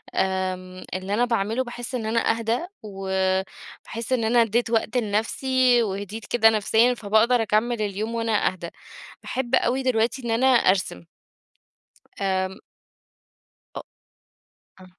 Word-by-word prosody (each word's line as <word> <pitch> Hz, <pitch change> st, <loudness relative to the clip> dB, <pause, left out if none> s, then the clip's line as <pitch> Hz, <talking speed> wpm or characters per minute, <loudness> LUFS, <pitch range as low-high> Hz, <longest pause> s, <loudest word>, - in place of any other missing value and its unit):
آمم 185 Hz, -1 st, -2 dB
اللي 190 Hz, +2 st, -3 dB
أنا 240 Hz, +4 st, +2 dB
باعمله 230 Hz, +1 st, 0 dB
باحِس 240 Hz, +1 st, -7 dB
إن 230 Hz, -3 st, -3 dB
أنا 225 Hz, +1 st, +1 dB
أهدا، 230 Hz, +8 st, -1 dB, 0.2 s
وباحس 190 Hz, +4 st, -3 dB
إن 245 Hz, -3 st, +1 dB
أنا 235 Hz, +2 st, +4 dB
ادّيت 230 Hz, +1 st, +1 dB
وقت 225 Hz, +1 st, 0 dB
لنفسي 245 Hz, +3 st, +2 dB
وهِديت 205 Hz, +2 st, -5 dB
كده 225 Hz, -2 st, +4 dB
نفسيًا، 220 Hz, +3 st, +3 dB
فباقدر 230 Hz, +2 st, +2 dB
أكمّل 225 Hz, +2 st, 0 dB
اليوم 210 Hz, +3 st, -3 dB
وأنا 225 Hz, -2 st, +1 dB
أهدا. 175 Hz, -2 st, -4 dB, 0.5 s
باحب 260 Hz, -1 st, -1 dB
أوي 260 Hz, +2 st, +1 dB
دلوقتي 240 Hz, 0 st, +1 dB
إن 235 Hz, -, -1 dB
أنا 240 Hz, +4 st, +2 dB
أرسم. 190 Hz, -, +2 dB, 1.2 s
آمم 190 Hz, -1 st, -1 dB, 1.2 s
أ -, -, -5 dB, 1.0 s
آه. -, -, -13 dB
225 Hz, 125 wpm, -24 LUFS, 195-240 Hz, 1.2 s, أنا